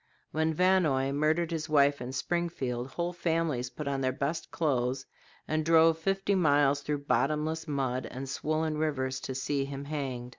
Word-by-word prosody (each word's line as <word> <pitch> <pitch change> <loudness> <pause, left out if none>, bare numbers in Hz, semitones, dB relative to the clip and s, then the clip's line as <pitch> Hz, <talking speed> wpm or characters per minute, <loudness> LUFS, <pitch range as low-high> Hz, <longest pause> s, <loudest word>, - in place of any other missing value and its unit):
When 160 +1 +1
Vannoy 160 -6 +3
murdered 155 +4 +1
his 160 -1 -3
wife 140 -2 +4
in 125 +1 -4
Springfield, 130 -4 -2
whole 170 +5 -3
families 165 -7 -1
put 150 +3 -7
on 135 -1 -1
their 130 -1 +1
best 145 +6 -3
clothes 130 -4 0 0.4
and 155 0 0
drove 165 0 +5
fifty 195 +3 0
miles 145 -5 +3
through 145 0 -3
bottomless 155 +3 0
mud 130 -3 -1
and 135 +1 -6
swollen 155 +2 -1
rivers 130 -4 -1
to 130 - -5
see 140 +1 -1
him 140 0 -6
hanged. 135 -5 -4
150 Hz, 160 wpm, -30 LUFS, 135-160 Hz, 0.4 s, drove